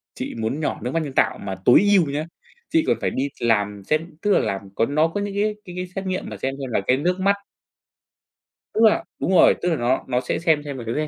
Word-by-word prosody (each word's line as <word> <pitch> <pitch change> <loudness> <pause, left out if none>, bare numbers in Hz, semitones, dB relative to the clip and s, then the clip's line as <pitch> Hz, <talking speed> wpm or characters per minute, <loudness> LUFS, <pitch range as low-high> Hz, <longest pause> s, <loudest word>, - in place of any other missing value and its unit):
chị - - -5
muốn 115 +5 -2
nhỏ 155 - -2
nước 125 - -2
mắt 165 - 0
nhân 140 -3 -6
tạo - - +2
mà 95 - -5
tối 125 - +7
ưu 185 -5 +5
nhá, 145 +2 -2 0.4
chị 325 0 +3
còn - - +2
phải - - +1
đi 135 +2 -2
làm 105 -3 +1
xét 155 +9 +1 0.2
tức 205 - +1
là - - +5
làm 95 0 -3
có 115 - +2
nó 155 +4 +2
có 185 +5 -3
những 200 0 -3
cái 210 +1 0
cái 180 -2 -9
cái 180 0 -4
xét 195 0 -4
nghiệm 185 0 -3
mà - - -7
xem 135 +1 -3
xem 135 - -4
là 105 - +1
cái 130 - +4
nước 180 +6 0
mắt 195 +2 +3 1.4
tức 220 - +1
là 220 - +5 0.2
đúng - - -1
rồi, 185 - +6
tức 180 - +1
là 165 - +1
nó 125 -1 0
nó 125 -1 0
sẽ 125 - -2
xem 160 -3 +2
xem 140 -2 -6
là 120 - -6
cái 155 0 -1
150 Hz, 265 wpm, -22 LUFS, 125-185 Hz, 1.4 s, tối